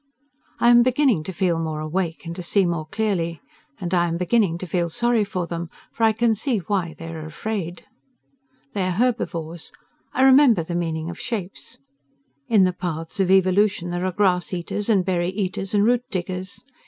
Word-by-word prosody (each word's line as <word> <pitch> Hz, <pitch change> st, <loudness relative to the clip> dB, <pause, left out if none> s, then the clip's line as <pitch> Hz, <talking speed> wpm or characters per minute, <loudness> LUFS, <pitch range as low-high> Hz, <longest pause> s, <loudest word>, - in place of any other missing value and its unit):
I 240 Hz, -, +5 dB
am 240 Hz, 0 st, +7 dB
beginning 255 Hz, -, +2 dB
to 190 Hz, -, -4 dB
feel 175 Hz, -2 st, 0 dB
more 160 Hz, -2 st, -3 dB
awake 165 Hz, +2 st, -3 dB
and 165 Hz, 0 st, -5 dB
to 180 Hz, -, -5 dB
see 190 Hz, +2 st, +2 dB
more 170 Hz, -3 st, -2 dB
clearly. 170 Hz, -5 st, -1 dB, 0.4 s
And 180 Hz, -2 st, -4 dB
I 175 Hz, -1 st, +3 dB
am 165 Hz, 0 st, -2 dB
beginning 180 Hz, -1 st, +2 dB
to 185 Hz, -, -6 dB
feel 175 Hz, 0 st, -1 dB
sorry 235 Hz, +5 st, +1 dB
for 185 Hz, -3 st, -3 dB
them, 170 Hz, 0 st, -5 dB, 0.2 s
for -, -, -9 dB
I 220 Hz, -, +6 dB
can 225 Hz, +1 st, +2 dB
see 230 Hz, +3 st, -1 dB
why 180 Hz, -3 st, -2 dB
they 165 Hz, +1 st, -7 dB
are 160 Hz, -1 st, -6 dB
afraid. 175 Hz, +2 st, -5 dB, 0.9 s
They 200 Hz, -, -1 dB
are 180 Hz, -1 st, -2 dB
herbivores. 175 Hz, -9 st, -1 dB, 0.4 s
I 260 Hz, -, +1 dB
remember 265 Hz, -, +6 dB
the 170 Hz, -, -6 dB
meaning 165 Hz, -1 st, -2 dB
of 170 Hz, -, -10 dB
shapes. 200 Hz, -6 st, -5 dB, 0.7 s
In 210 Hz, -4 st, +5 dB
the 185 Hz, -1 st, +2 dB
paths 165 Hz, -1 st, -5 dB
of 190 Hz, -2 st, +2 dB
evolution 190 Hz, -1 st, +3 dB
there 175 Hz, +1 st, -1 dB
are -, -, -1 dB
grass 180 Hz, -2 st, +1 dB
eaters 200 Hz, +5 st, -3 dB
and 195 Hz, -5 st, +3 dB
berry 175 Hz, -2 st, 0 dB
eaters 190 Hz, 0 st, -3 dB
and 205 Hz, 0 st, +4 dB
root 245 Hz, +1 st, +3 dB
diggers. 185 Hz, +1 st, -5 dB
185 Hz, 190 wpm, -23 LUFS, 170-210 Hz, 0.9 s, am